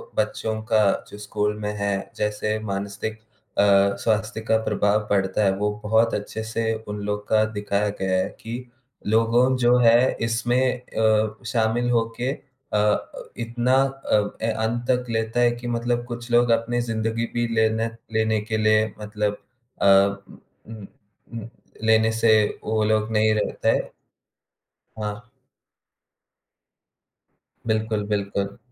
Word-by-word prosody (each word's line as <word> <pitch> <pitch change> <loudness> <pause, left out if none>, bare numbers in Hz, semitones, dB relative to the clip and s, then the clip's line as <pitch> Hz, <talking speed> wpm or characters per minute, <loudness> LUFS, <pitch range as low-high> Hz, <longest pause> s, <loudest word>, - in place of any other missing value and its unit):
बच्चों 110 0 -1
का 110 -1 +5 0.3
जो - - -10
स्कूल 105 0 -2
में 105 0 -2
है, 100 -1 -2
जैसे 105 +1 -1
मानसिक 100 +2 -4 0.4
अ, - - +5 0.4
स्वास्थ्य 110 +1 -1
का 110 0 +2
प्रभाव 105 +1 +1
पड़ता 95 +1 +1
है, 95 - +4
वो 105 +1 0
बहुत 110 +2 +2
अच्छे 105 +2 -4
से 110 0 -1
उन 105 0 -5
लोग 105 0 -3
का 110 0 +3
दिखाया 105 0 -1
गया 95 -1 +1
है 95 - 0
कि 115 +2 -5 0.5
लोगों 115 +4 +3
जो 125 0 +4
है 120 +2 +5
इसमें 120 +2 +1 0.2
अ, 110 -1 0
शामिल 115 +1 0
होके 115 +2 0 0.4
अ - - +3
अ, 105 0 0 0.2
इतना 120 +2 0
अ, 135 -6 -1
ए 115 - +1
अंत 115 +2 -1
तक 125 -1 +2
लेता 115 +1 -1
है 120 0 +4
कि 120 0 -6
मतलब 120 0 -1
कुछ 120 0 -7
लोग 120 0 +4
अपनी 115 +1 +1
जिंदगी 115 0 -1
भी 120 0 0
लेने 110 0 +2 0.3
लेने 110 0 +2
के 110 +1 -2
लिए 110 0 +3
मतलब 105 -1 -2 0.4
अ, - - +2
उ 100 0 +3 0.4
उम 105 -3 -9 0.5
उम, 110 - -8 0.4
लेने 110 0 +4
से 115 0 +1 0.3
वो 110 0 0
लोग 110 0 +1
नहीं 110 0 +3
रहता 105 - -1
है। - - 0 1.1
हाँ। 105 -1 -2 2.5
बिल्कुल, 110 -1 0
बिल्कुल। 100 -1 -2
110 Hz, 140 wpm, -23 LUFS, 105-115 Hz, 2.5 s, का